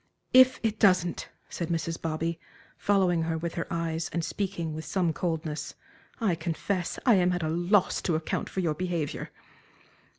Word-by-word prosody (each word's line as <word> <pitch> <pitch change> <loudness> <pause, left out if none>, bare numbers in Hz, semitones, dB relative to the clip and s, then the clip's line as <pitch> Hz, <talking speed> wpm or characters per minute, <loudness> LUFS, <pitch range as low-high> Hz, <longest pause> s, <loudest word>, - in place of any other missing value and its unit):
"If 255 0 +7
it 220 -1 0
doesn't," 180 -3 +3 0.2
said 170 - -4
Mrs. 165 0 -2
Bobby, 165 +1 -2 0.4
following 185 -4 +2
her 160 0 -1
with 165 +1 -3
her 165 - -3
eyes 165 -1 -2
and 170 -1 -1
speaking 175 -5 -3
with 160 +1 -5
some 170 +1 0
coldness, 160 -2 -3 0.4
"I 215 -6 +2
confess 170 +2 -2
I 245 - +7
am 180 0 +3
at 175 -2 -2
a 155 - 0
loss 175 +4 +2
to 170 - 0
account 160 0 -2
for 190 - -2
your 165 -4 +1
behavior." 170 -3 -3
170 Hz, 165 wpm, -28 LUFS, 160-185 Hz, 0.4 s, If